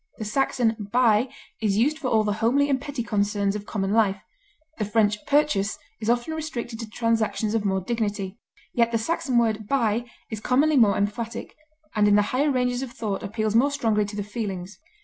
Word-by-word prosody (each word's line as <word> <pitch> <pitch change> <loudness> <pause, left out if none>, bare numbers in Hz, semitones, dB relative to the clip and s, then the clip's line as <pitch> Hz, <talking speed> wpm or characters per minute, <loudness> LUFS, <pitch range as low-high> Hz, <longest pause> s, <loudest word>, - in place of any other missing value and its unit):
The 220 - -5
Saxon 225 -2 0
buy 240 0 +4 0.3
is 205 -2 +1
used 295 +8 +2
for 260 - -3
all 220 -3 +3
the 210 -1 0
homely 280 +5 +3
and 265 -1 +1
petty 285 -4 -4
concerns 205 -2 0
of 210 +1 -6
common 195 -2 -1
life, 205 -3 +3 0.6
the - - +1
French 210 0 +1
purchase 285 -9 +2 0.2
is 220 0 -2
often 240 +6 +1
restricted 250 -8 -5
to 225 -2 -6
transactions 225 -1 0
of 220 -2 0
more 190 -1 +1
dignity; 205 -2 -3 0.3
yet 235 -1 +2
the 230 - +2
Saxon 270 +2 -1
word 220 -3 +1
buy 235 -3 +1 0.3
is 220 - -3
commonly 280 +7 +2
more 210 -5 +5
emphatic, 220 +3 -3 0.4
and 210 -1 +3
in 205 - +5
the 210 - +5
higher 285 +4 +2
ranges 250 -2 0
of 265 -3 -5
thought 210 -4 -3
appeals 215 0 -2
more 250 +5 +4
strongly 220 -7 +1
to 205 +1 -7
the 205 - -2
feelings. 195 -3 -5
225 Hz, 190 wpm, -25 LUFS, 210-245 Hz, 0.6 s, more